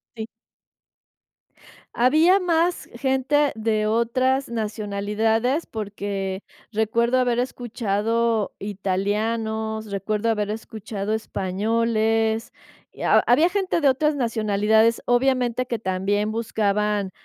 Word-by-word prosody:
Sí. 220 -1 -6 1.7
Había 315 +10 +4
más 345 -1 0
gente 265 +3 +1
de 215 -1 0
otras 255 +4 +1
nacionalidades 220 +4 -1
porque 200 -2 -4 0.3
recuerdo 230 +3 +1
haber 245 -2 +1
escuchado 230 -2 -1
italianos, 220 +3 -2
recuerdo 210 +3 -1
haber 210 -2 0
escuchado 215 -1 -5
españoles, 220 +2 0 0.4
y - - -13
ha - - +4
había 305 +8 +4
gente 375 -3 -1
de 285 - +5
otras 300 +3 +1
nacionalidades, 220 -2 +2
obviamente, 250 0 +1
que 235 -2 -3
también 205 +2 -1
buscaban, 210 -3 0
225 Hz, 95 wpm, -23 LUFS, 210-245 Hz, 1.7 s, de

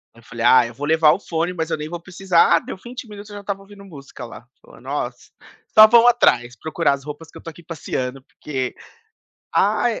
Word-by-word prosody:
eu 115 - -19
falei: 120 -1 -5
"Ah, 120 0 +6
eu - - -11
vou 145 +1 -5
levar 160 -1 +5
o - - -3
fone, 170 -1 -2
mas 160 -1 -3
eu - - -1
nem 150 +1 -6
vou 175 0 -6
precisar". 180 -1 +2
Ah, - - 0
deu - - -8
vinte 240 +3 -9
minutos, 205 0 -11
eu 205 - -10
já 205 - -7
estava 200 -1 -5
ouvindo 200 0 -15
música 140 -7 -11
lá, 115 +1 -12
falou - - -18
nossa, 130 -2 -5 0.4
só 215 0 +10
vão 235 +1 +6
atrás, 130 - +3
procurar 160 0 0
as 140 -1 -6
roupas 150 +2 -9
que - - -13
eu - - -12
tô 165 - -7
aqui 165 +2 -14
passeando, 135 -5 -5
porque, 130 -4 -5 0.8
ah - - +2
160 Hz, 230 wpm, -21 LUFS, 135-195 Hz, 0.8 s, só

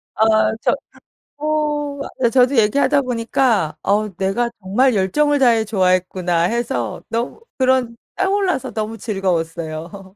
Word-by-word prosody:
어 220 0 +3
저 - - +2 0.6
어 295 -4 -1
저도 255 +2 +4
얘기하다 280 +6 +3
보니까 230 - 0
어 210 +2 +1
"내가 195 +6 0
정말 225 +7 +2
열정을 290 +10 +2
다 255 -3 +5
해 225 -1 +2
좋아했구나." 185 -3 +1
해서 235 +8 -2
너무 235 - -3 0.2
그런 255 -3 +1 0.2
떠올라서 385 -6 0
너무 220 +1 -4
즐거웠어요. 180 -2 -4
225 Hz, 260 characters per minute, -19 LUFS, 190-265 Hz, 0.6 s, 다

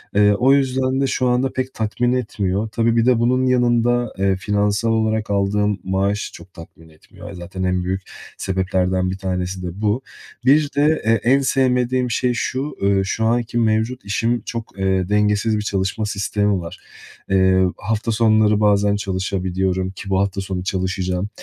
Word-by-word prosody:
Iıı, 105 0 +5
o 130 +6 +4
yüzden 130 -1 +1
de 135 - +2
şu 130 -1 0
anda 125 +2 +1
pek 130 0 -3
tatmin 120 +3 -1
etmiyor. 105 -4 -1
Tabii, 115 +1 +1
bir 115 - +3
de 125 -2 +3
bunun 130 +2 +2
yanında, 120 -1 +2
eee, 95 0 +1
finansal 105 +3 0
olarak 110 -1 0
aldığım 100 0 +1
maaş 100 +2 -1
çok 90 +2 -13
tatmin 80 -1 -14
etmiyor. 100 +6 -13
Zaten 90 +1 -6
en 90 -1 0
büyük 95 +1 -2 0.4
sebeplerden 95 -1 0
1 95 - -5
tanesi 90 -1 -3
de - - -3
bu. 105 +4 +1 0.4
Bir 145 +2 +4
de 150 +2 +2
e 115 - +3
en 120 +5 +3
sevmediğim 125 -2 +1
şey 125 0 +1
şu. 130 +4 -3
Iıı, 100 -1 +2
şu 110 +3 -1
anki 120 +1 0
mevcut 110 +2 0
işim 115 +4 0
çok, 115 -4 -7
eee, 95 -1 0
dengesiz 105 +1 +2
bir 105 - -2
çalışma 100 +1 -2
sistemi 100 -1 0
var. 85 - -9 0.5
Iıı, 95 -1 +3
hafta 110 +2 -2
sonları 110 -2 +3
bazen 105 -1 +3
çalışabiliyorum 95 -1 -2
ki 95 +1 -9
bu 95 - +2
hafta 100 0 -1
sonu 95 -1 -4
çalışacağım. 95 0 -2
105 Hz, 165 wpm, -20 LUFS, 95-120 Hz, 0.5 s, Iıı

